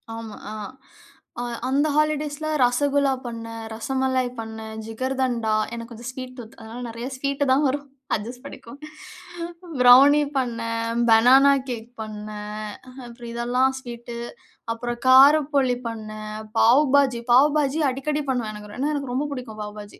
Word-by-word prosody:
ஆமா, 225 -2 -8 0.2
ஆ. - - -6 0.9
அ - - -2 0.3
அந்த 285 +3 +2
ஹாலிடேஸ்ல 305 0 0 0.2
ரசகுல்லா 275 +2 +2
பண்ணேன், 230 -1 -6
ரசமலாய் 260 +2 -1
பண்ணேன், 220 0 -7
ஜிகர்தண்டா 245 -1 -1 0.2
எனக்கு 230 +1 -7
கொஞ்சம் 235 +1 -7
ஸ்வீட் 255 0 -8
டூத். 230 -2 -11
அதனால 225 +2 -9
நெறைய 235 +2 -6
ஸ்வீட்டு 280 +1 -1
தான் 280 +3 +4
வரும். 285 +2 -2 0.3
அட்ஜஸ்ட் 240 +5 -7
பண்ணிக்கோங்க. 275 +1 -11 1.0
ப்ரௌனி 275 +4 +8
பண்ணேன், 230 -1 -1
பெனானா 260 +5 +7 0.2
கேக் 235 -1 -5
பண்ணேன். 210 0 -6 0.2
அஹ 255 +1 -13
அப்பறம் 235 0 -10
இதெல்லாம் 250 +3 +1
ஸ்வீட்டு, 235 -2 -8 0.6
அப்பறம் 240 +1 -5
காரப்போலி 275 -1 +6
பண்ணேன். 215 -1 -7 0.3
பாவு 250 +6 +6
பாஜி 260 -4 +3
பாவுபாஜி 290 +3 +4
அடிக்கடி 295 +3 -2
பண்ணுவேன். 235 -4 -2
எனக்கு 210 0 -10
ரொ - - -10
ஏன்னா, 290 +3 0
எனக்கு 275 -3 -4
ரொம்ப 285 +3 -1
புடிக்கும் 230 -5 -7
பாவுபாஜி. 210 0 -10
245 Hz, 135 wpm, -23 LUFS, 230-275 Hz, 1.0 s, ப்ரௌனி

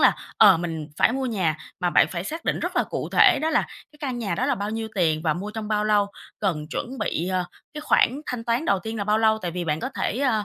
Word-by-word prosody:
là, - - +6 0.3
ờ, 200 -5 +8
mình 165 -3 -4
phải - - +4
mua 265 0 -1
nhà, 180 -9 0 0.2
mà 175 -1 +1
bạn - - +5
phải 175 0 -4
xác 325 +8 -5
định - - 0
rất - - -3
là - - +3
cụ - - -4
thể 395 -7 +6
đó 320 - +1
là 310 - +3 0.3
cái 300 - -20
căn 260 -5 -3
nhà 200 -7 -2
đó 255 - -1
là 280 - +2
bao 205 -1 -3
nhiêu 225 0 -3
tiền 160 -5 +2
và 155 - +2
mua 200 +4 -5
trong 220 -1 -5
bao 210 -1 +1
lâu, 205 -1 +3 0.3
cần 160 -7 -1
chuẩn 255 +2 -4
bị, 175 +3 -1
ờ, 185 -1 0 0.3
cái 300 - -5
khoản 285 -2 +2
thanh 245 -2 -4
toán 235 +6 0
đầu 200 - +2
tiên 220 +3 -6
là 200 - -2
bao 210 +1 +2
lâu, 220 -1 +3
tại 180 -5 -4
vì 175 0 -4
bạn 155 0 -1
có - - -2
thể, 235 - -1
a, 225 -7 +1
210 Hz, 280 wpm, -24 LUFS, 180-245 Hz, 0.3 s, ờ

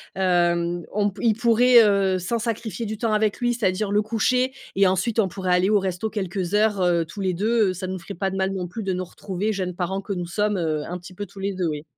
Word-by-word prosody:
hem, 175 -2 +1
on 205 0 +2
p 195 - -13
il 220 - +5
pourrait, 235 +1 +6
heu, 195 -2 +2
sans 225 +6 -2
sacrifier 230 0 -3
du 215 0 -4
temps 225 -1 -1
avec 215 -1 +1
lui, 240 0 +2
c'est-à-dire 200 -2 0
le 210 +1 +3
coucher 250 +4 +1 0.2
et 195 -1 +5
ensuite 190 +5 0
on 200 - +4
pourrait 185 0 -1
aller 185 +3 +2
au 210 -1 +4
resto 190 +3 -2
quelques 190 -3 -3
heures, 210 -1 +3
heu, 175 -2 +3
tous 165 +6 -10
les 190 -2 0
2, 215 +2 +2
heu, - - -4
ça 185 +1 -5
nous 185 0 -4
ferait 185 +4 -8
pas 190 +2 -2
de 190 - -4
mal 190 0 0
non 185 -2 -3
plus 220 +3 -6
de 190 -1 -1
nous 185 0 -2
retrouver, 195 +3 -4
jeunes 185 -3 -3
parents 190 +2 -2
que 200 - -4
nous 175 -1 -3
sommes, 210 +3 0
heu, 155 -3 -1
un 180 +1 -4
petit 180 +1 -12
peu 205 +2 -5
tous 195 +1 -14
les 195 0 -2
2, 180 -2 -1
oui. 150 -1 -3
195 Hz, 265 wpm, -23 LUFS, 180-215 Hz, 0.2 s, pourrait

